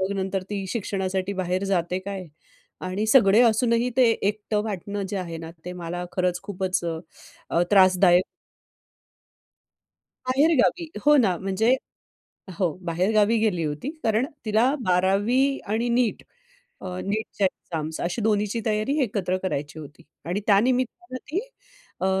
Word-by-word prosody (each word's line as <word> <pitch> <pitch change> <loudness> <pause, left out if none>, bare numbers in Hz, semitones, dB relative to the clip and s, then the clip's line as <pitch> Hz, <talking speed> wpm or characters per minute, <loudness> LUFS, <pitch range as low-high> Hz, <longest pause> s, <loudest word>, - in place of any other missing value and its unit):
मग 190 +1 0
नंतर 190 0 -2
ती 195 -2 -3
शिक्षणासाठी 190 -3 -2
बाहेर 185 0 -1
जाते 180 -1 0
काय 190 -2 -6 0.6
आणि 200 +4 -2
सगळे 220 -2 +6
असूनही 235 +1 +3
ते 245 -3 +5
एकटं 210 0 -1
वाटणं, 200 0 -4
जे 200 - -3
आहे 170 -3 -5
ना, 160 0 -8
ते 180 - -5
मला 175 0 -5
खरंच 180 -1 0
खूपच 185 -3 -2
अ, 165 +1 -4
त्रासदायक 185 -2 +5 2.0
बाहेर 290 +6 +3
गावी, 340 -2 +1 0.2
हो 295 0 +7
ना. 190 -9 +3
म्हणजे 195 +7 +2 0.8
हो 175 -5 +1
बाहेरगावी 205 +6 +2
गेली 200 -7 +1
होती 150 - -3
कारण 225 +4 +1 0.2
तिला 225 +6 +2
12वी 205 +10 +2 0.2
आणि 235 +2 0
नीट 235 -1 +1 0.6
अ, - - -8 0.2
नीटच्या 205 0 -2
एक्झाम्स 160 -3 -5
अशी 180 +6 -2
दोन्हीची 210 +1 +1
तयारी 215 +6 0
एकत्र 195 -5 -1
करायची 150 -5 -3
होती 150 +2 -11 0.2
आणि 180 +5 -2
त्या 200 -2 +6
निमित्तानं 255 +6 -1
ती 365 +6 0 0.6
अ, 190 - +1
200 Hz, 135 wpm, -24 LUFS, 180-225 Hz, 2.0 s, हो